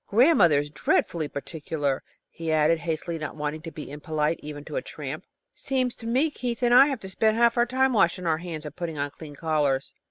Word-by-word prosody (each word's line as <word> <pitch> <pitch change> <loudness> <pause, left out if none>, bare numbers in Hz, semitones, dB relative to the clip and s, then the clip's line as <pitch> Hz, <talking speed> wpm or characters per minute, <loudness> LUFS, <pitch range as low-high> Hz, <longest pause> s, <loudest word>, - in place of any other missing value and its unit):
Grandmother 210 - +5
is 145 +1 -2
dreadfully 155 +1 0
particular," 145 -1 -3 0.3
he 165 -1 -5
added, 155 +1 +3
hastily, 165 0 -3
not 155 -2 -5
wanting 150 +1 -3
to 165 - -7
be 150 -2 -8
impolite 150 +1 -1
even 145 -1 -8
to - - -7
a - - 0
tramp. - - -7 0.3
"Seems 255 -2 -1
to 230 - -8
me 265 +7 +2
Keith 250 -2 -4
and 240 0 +4
I 265 +3 +9
have 270 -6 -3
to 190 - -7
spend 220 +3 +2
half 235 0 +4
our 240 0 +3
time 260 +1 +2
washing 180 -4 +2
our 160 -1 +1
hands 165 -3 -6
and 150 0 -7
putting 170 -3 -4
on 145 0 -2
clean 150 -1 -11
collars." 145 -3 0
165 Hz, 215 wpm, -26 LUFS, 150-235 Hz, 0.3 s, I